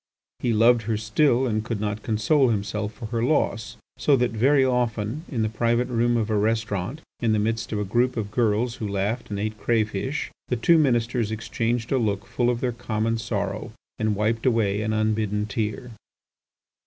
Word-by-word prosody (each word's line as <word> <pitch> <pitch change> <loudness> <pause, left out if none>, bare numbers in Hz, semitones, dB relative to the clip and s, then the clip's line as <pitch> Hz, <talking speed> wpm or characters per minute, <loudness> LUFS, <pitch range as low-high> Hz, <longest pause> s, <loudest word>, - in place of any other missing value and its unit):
He 120 - 0
loved 115 +2 +5
her 110 - +1
still, 120 +4 +2
and 110 -3 0
could 115 -2 -3
not 105 0 -2
console 125 +6 +2
himself 105 0 -2
for 115 +2 -9
her 115 +1 -2
loss, 115 -5 0 0.2
so 145 - +4
that 125 -2 +1
very 135 +5 +3
often 120 +2 -1
in 120 -7 -1
the - - +1
private 120 +3 0
room 120 0 +2
of 110 -1 -1
a 105 - +2
restaurant, 110 - -1 0.2
in 115 -2 +1
the - - +2
midst 110 +2 -1
of 110 - -1
a 105 - -1
group 120 +5 +1
of 105 -2 -3
girls 115 +1 +1
who 110 - -3
laughed 100 +5 -2
and 105 - -3
ate 105 +1 -3
crayfish, 115 +4 -1 0.2
the 125 - 0
two 160 +8 +4
ministers 120 -5 +1
exchanged 115 +1 -2
a 135 - +3
look 105 -3 -1
full 120 -1 0
of 120 -1 -1
their 125 - 0
common 115 -1 -2
sorrow 105 -2 -3 0.3
and 110 -1 +1
wiped 110 +4 0
away 105 -4 +2
an 110 0 -1
unbidden 110 -1 0
tear. 110 +3 -3
115 Hz, 190 wpm, -24 LUFS, 105-120 Hz, 0.3 s, loved